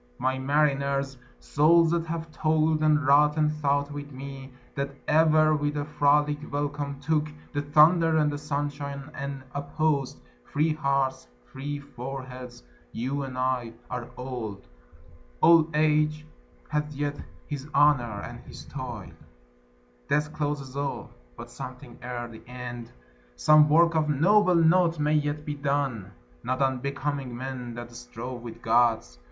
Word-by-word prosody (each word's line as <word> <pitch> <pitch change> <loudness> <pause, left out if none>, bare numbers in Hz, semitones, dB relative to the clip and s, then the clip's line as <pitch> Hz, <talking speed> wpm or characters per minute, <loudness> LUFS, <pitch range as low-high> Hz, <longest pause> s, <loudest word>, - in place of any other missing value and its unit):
My 130 0 0
mariners, 140 -1 +1 0.2
Souls 160 - +4
that 170 -1 0
have 165 0 -4
toil'd, 155 0 +1
and 155 -1 +3
wrought, 150 +2 +5
and 150 -1 +3
thought 145 -1 0
with 145 0 -7
me 135 0 -8 0.2
That 140 -1 -2 0.2
ever 155 0 +4
with 145 0 -1
a 145 - -2
frolic 150 0 +2
welcome 145 -1 -3
took 150 +1 0 0.3
The 145 - 0
thunder 160 +3 +5
and 150 -1 +2
the 145 - -4
sunshine, 145 -1 -4
and 140 -1 -5
opposed 145 -1 -1 0.3
Free 155 - 0
hearts, 140 -3 0 0.2
free 145 - -5
foreheads 130 - -8 0.3
you 135 +5 -2
and 130 -2 -6
I 130 -2 -1 0.2
are 125 -1 -4
old; 120 -6 -6 0.7
Old 165 -1 +6
age 155 0 +2 0.4
hath 150 0 -1
yet 145 0 -3 0.3
his 145 -1 -6
honour 125 -8 +3
and - - -8
his - - -12
toil; - - -7 1.0
Death 150 +1 +1
closes 145 -3 -3
all: 140 0 -3 0.3
but - - -9
something 125 -1 -9
ere 120 -1 -5
the 115 -1 -12
end, 120 -1 -7 0.4
Some 150 - +6
work 170 +2 +5
of 155 -1 +1
noble 180 +6 +4
note, 170 +1 +4
may 150 0 +1
yet 150 0 0
be 150 - -3
done, 140 -8 -2 0.3
Not 130 +2 -1
unbecoming 135 -1 -2
men 125 -2 -6
that 120 0 -8
strove 120 +1 -7
with 115 -1 -10
Gods. 110 - +2
145 Hz, 140 wpm, -27 LUFS, 130-150 Hz, 1.0 s, Old